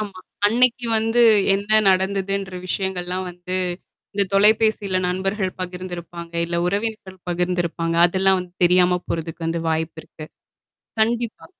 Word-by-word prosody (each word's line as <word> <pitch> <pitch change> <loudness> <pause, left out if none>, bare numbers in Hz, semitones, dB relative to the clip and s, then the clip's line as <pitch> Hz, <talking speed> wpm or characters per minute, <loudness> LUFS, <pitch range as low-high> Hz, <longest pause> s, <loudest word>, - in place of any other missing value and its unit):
ஆமா, 200 -3 -6 0.3
அன்னைக்கு 245 +2 +2
வந்து 225 +2 +1 0.3
என்ன 210 +2 +3
நடந்ததுன்ற 190 0 0
விஷயங்கள்லாம் 185 -1 -2
வந்து, 180 +1 -5 0.6
இந்த 200 0 +2
தொலைபேசியில 210 -2 +3
நண்பர்கள் 190 +1 -1
பகிர்ந்திருப்பாங்க, 175 -2 -7
இல்லை 170 0 -2
உறவினர்கள் 200 -2 -3
பகிர்ந்திருப்பாங்க. 175 -1 -1
அதெல்லாம் 190 +1 +2
வந்து 180 -1 -9
தெரியாமப் 180 0 +3
போறதுக்கு 165 0 -4
வந்து 165 0 -2
வாய்ப்பு 160 +1 -2
இருக்கு. 155 - -11 0.8
கண்டிப்பா. 230 0 -1
185 Hz, 115 wpm, -22 LUFS, 175-205 Hz, 0.8 s, என்ன